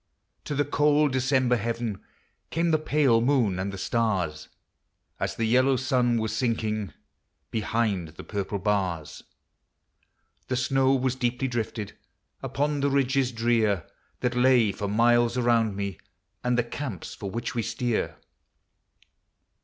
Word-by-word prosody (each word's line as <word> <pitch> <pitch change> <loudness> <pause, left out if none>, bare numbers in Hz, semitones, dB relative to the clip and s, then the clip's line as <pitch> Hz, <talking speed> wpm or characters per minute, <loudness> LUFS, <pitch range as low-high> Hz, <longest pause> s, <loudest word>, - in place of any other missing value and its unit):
To 145 - -3
the 145 +1 +1
cold 150 0 +3
December 130 -1 +2
heaven 115 -2 -3 0.5
Came 170 +1 +1
the 155 - +3
pale 145 -7 +3
moon 120 -8 +2
and 95 +2 -2
the 100 - -7
stars, 95 -8 -1 0.7
As - - -2
the 115 - -1
yellow 130 +4 +4
sun 125 -2 +1
was 110 -1 -1
sinking 110 - -1 0.6
Behind 110 -5 0
the 80 - -11
purple 100 -1 -3
bars. 95 -6 -1 1.3
The 130 - -1
snow 135 +1 +2
was 130 -1 +1
deeply 125 0 -1
drifted 115 -4 -4 0.5
Upon 145 +3 -1
the 140 0 +2
ridges 135 -1 +1
drear, 115 -6 +1 0.4
That 125 -1 0
lay 125 -4 +4
for 100 +1 -4
miles 120 +3 +3
around 115 -4 +2
me 100 -2 -4 0.4
And 125 0 +1
the 120 - +3
camps 120 - -6
for 100 - -6
which 115 +4 -4
we 120 - 0
steer. 115 +1 -2
120 Hz, 135 wpm, -26 LUFS, 105-130 Hz, 1.3 s, yellow